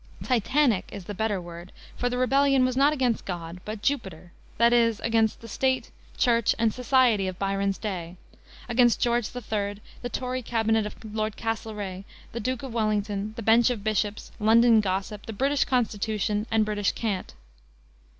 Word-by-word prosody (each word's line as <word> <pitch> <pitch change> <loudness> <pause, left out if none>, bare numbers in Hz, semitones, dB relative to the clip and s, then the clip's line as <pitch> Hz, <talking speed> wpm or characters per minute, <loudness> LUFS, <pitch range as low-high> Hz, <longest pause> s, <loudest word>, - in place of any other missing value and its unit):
Titanic 250 -2 +2
is 195 -3 -8
the 205 - -5
better 205 0 -1
word, 175 +1 -10 0.2
for 245 - -1
the 250 - -2
rebellion 270 +1 +3
was 255 -1 -1
not 280 +3 +4
against 255 -6 0
God, 175 -1 -6
but 210 -1 -6
Jupiter, 190 - -2 0.3
that 235 +1 +4
is, 230 -2 +3
against 225 -1 +1
the 230 - -10
State, 260 +3 -1 0.3
Church, 235 -3 +3
and 225 -1 +2
society 250 -6 +3
of 185 -1 -5
Byron's 195 0 -1
day; 180 -4 -5 0.5
against 240 -1 +3
George 240 -2 +1
III., 210 -4 -2 0.3
the 245 - -4
Tory 255 0 -3
cabinet 225 -2 +1
of 210 - -9 0.2
Lord 215 -1 -2
Castlereigh, 210 -4 -4 0.3
the 235 - -5
Duke 255 +3 -3
of 260 -4 -6
Wellington, 210 -2 -1
the 230 - -6
bench 230 +3 +5
of 230 -5 -3
Bishops, 215 -1 -1
London 225 +1 +5
gossip, 195 +2 -3
the 225 - -5
British 275 +6 +1
Constitution, 215 -3 -1
and 220 -1 +2
British 205 -2 0
cant. 205 - -3
220 Hz, 165 wpm, -26 LUFS, 205-245 Hz, 0.5 s, bench